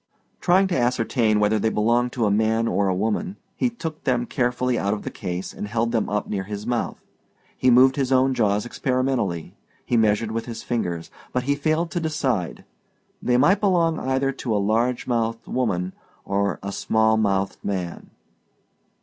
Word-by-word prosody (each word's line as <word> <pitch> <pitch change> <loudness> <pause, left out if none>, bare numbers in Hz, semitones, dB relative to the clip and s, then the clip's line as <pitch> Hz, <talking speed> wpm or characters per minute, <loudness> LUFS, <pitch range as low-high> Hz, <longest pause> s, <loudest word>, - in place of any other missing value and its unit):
Trying 185 +2 +4
to 180 - 0
ascertain 115 -2 +1
whether 105 +1 +2
they 110 - +1
belonged 120 +3 +1
to 120 -4 0
a 105 - +2
man 110 +2 +2
or 100 -3 +1
a 95 - +1
woman, 110 - -1 0.2
he 250 - +1
took 165 -10 -7
them 125 -3 +1
carefully 125 0 0
out 100 -2 0
of 105 - -8
the - - -5
case 90 -1 -5
and 105 - -5
held 115 +2 0
them 115 -2 0
up 105 0 -1
near 95 -2 -3
his 105 +1 -6
mouth. 120 -1 -2 0.5
He 130 - +2
moved 130 +2 +6
his 135 -2 0
own 130 0 +4
jaws 105 -3 +1
experimentally; 125 - -1 0.3
he 120 - +1
measured 110 0 +2
with 115 +1 -3
his 115 -1 -6
fingers; 85 -8 -3 0.2
but 125 - 0
he 140 +2 +1
failed 155 +4 0
to 175 - -1
decide: 135 - -2 0.6
they 125 0 +2
might 170 +10 +4
belong 170 -5 +2
either 135 +1 0
to 125 -4 -3
a - - +3
large 115 +5 +1
mouthed 115 -1 -1
woman 95 -8 -1 0.3
or 100 -3 0
a 100 - -3
small 110 +2 +2
mouthed 100 -3 0
man. 90 -4 -4
115 Hz, 180 wpm, -23 LUFS, 105-130 Hz, 0.6 s, moved